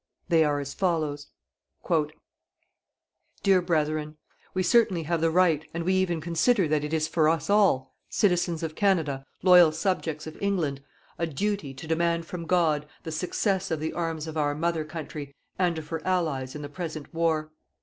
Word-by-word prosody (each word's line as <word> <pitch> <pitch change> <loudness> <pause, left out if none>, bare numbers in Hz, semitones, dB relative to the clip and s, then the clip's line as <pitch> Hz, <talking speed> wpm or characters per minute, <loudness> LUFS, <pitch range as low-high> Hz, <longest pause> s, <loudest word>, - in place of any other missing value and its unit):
They 165 -2 +5
are 145 -1 +1
as 140 0 -5
follows: 155 -6 -1 2.2
"Dear 195 -2 +5
Brethren, 155 -3 -1 0.4
we 185 - +1
certainly 190 -3 +3
have 165 +1 -1
the 165 - +3
right, 165 -3 +3
and 170 - -2
we 185 +3 +1
even 185 -3 +1
consider 175 +4 +2
that 150 -1 +1
it 150 - -4
is 155 -1 +1
for 155 -1 +3
us 165 +2 0
all, 190 -11 +3 0.2
citizens 175 -4 +1
of 160 -1 -3
Canada, 155 -9 +1 0.2
loyal 180 -3 +8
subjects 160 -2 -2
of 155 - -9
England, 170 -9 0 0.4
a 170 - 0
duty 160 -2 -2
to 130 - -9
demand 170 +1 0
from 170 -1 -6
God 160 -4 +2 0.2
the 160 - -5
success 190 +4 -1
of 160 - -1
the 160 +1 -3
arms 165 -2 -2
of 160 -1 -6
our 145 -1 +1
Mother 165 +1 0
country 150 -3 -7 0.2
and 175 -3 +2
of 155 -1 -7
her 165 -1 -3
Allies 155 -8 -1
in 150 - -6
the - - -4
present 155 -1 -6
war. 160 -2 0
160 Hz, 170 wpm, -27 LUFS, 155-180 Hz, 2.2 s, loyal